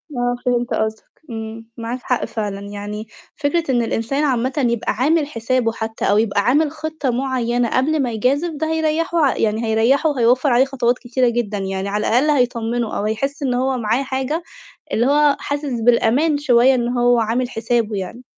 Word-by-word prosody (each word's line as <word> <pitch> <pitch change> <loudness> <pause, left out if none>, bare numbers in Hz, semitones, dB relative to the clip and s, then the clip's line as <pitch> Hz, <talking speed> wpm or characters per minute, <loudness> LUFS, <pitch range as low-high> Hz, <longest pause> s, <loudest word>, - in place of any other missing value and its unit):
آه، 245 0 0
فهمت 245 -1 0
قصدك، 220 0 -2 0.3
إمم، 225 0 -7
معاك 235 +2 -4
حق 250 - 0
فعلًا، 205 -3 -4
يعني 205 +1 -7 0.3
فكرة 315 +3 0
إن 245 - +2
الإنسان 235 +5 -1
عامةً 260 -2 0 0.2
يبقى 235 -2 -1
عامل 290 +7 +1
حسابه 235 -2 0
حتّى 220 0 -4
أو 205 - +4
يبقى 215 -2 +2
عامل 285 +7 +2
خطة 310 -2 -4
معيّنة 245 -2 0
قبل 295 +6 +1
ما 250 -3 -1
يجازف 280 +9 0
ده 315 +2 -1
هيريّحه 320 +2 0
ع 270 - +1
يعني 220 +1 0
هيريّحه 230 +8 +2
وهيوفّر 255 0 +2
عليه 245 +2 +4
خطوات 250 -2 0
كتيرة 245 0 +1
جدًا 230 -3 -2
يعني 195 0 -3
على 210 +1 -1
الأقل 255 +6 +3
هيطمّنه، 240 -4 0
أو - - -2
هيحس 275 +7 -2
إن 260 -2 0
هو 260 +1 0
معاه 235 +3 0
حاجة 265 +5 -2 0.5
اللي 235 - +2
هو 290 +1 +4
حاسس 285 -5 -3
بالأمان 245 +6 +3
شوية 260 -2 +4
إن 240 -1 -1
هو 245 -1 +3
عامل 235 +3 0
حسابه 225 -2 -1
يعني. 195 +6 -6
245 Hz, 175 wpm, -20 LUFS, 225-275 Hz, 0.5 s, أو